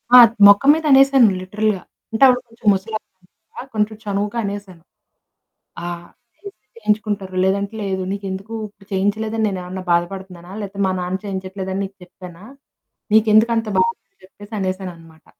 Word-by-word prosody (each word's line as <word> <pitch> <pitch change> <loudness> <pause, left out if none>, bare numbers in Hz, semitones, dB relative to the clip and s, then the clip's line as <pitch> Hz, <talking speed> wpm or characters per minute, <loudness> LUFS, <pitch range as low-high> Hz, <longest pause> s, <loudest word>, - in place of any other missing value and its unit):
ఆ! - - +12 0.3
మొకం 205 +7 +6
మీద 320 0 -4
అనేశాను 270 -3 +6
లిటరల్‌గా. 205 0 -1 0.3
అంటే 225 +4 +1
అవిడు 250 -1 +4
కొంచెం 230 -1 -10
ముసలావిడ, 195 -1 -6 0.5
కొంచెం 215 0 0
చనువుగా 205 +3 -2
అనేశాను. 200 -4 -6 1.0
ఆ! - - -4 0.5
చేయిస్తే 400 0 -13
చేయించుకుంటారు, 210 - -2
లేదంటే 200 +2 0
లేదు. 190 -1 -2
నీకెందుకు 195 +2 -6 0.2
ఇప్పుడు 200 -1 -23
చేయించలేదని 215 +3 0
నేనుమన్నా 185 0 -6
బాధపడుతున్నానా? 180 +1 -3
లేకపోతే 200 0 -5
మా 185 - 0
నాన్న 180 +1 -2
చేయించట్లేదని 190 0 -4
నీకు 195 +1 -12
చెప్పానా? 180 +1 -13 0.7
నీకెందుక 220 +1 +5
అంత 225 -1 -3
బాధని 465 0 +1 0.3
చెప్పేసి 205 +3 -13
అనేశాననమాట. 180 -4 -6
200 Hz, 130 wpm, -20 LUFS, 190-215 Hz, 1.0 s, ఆ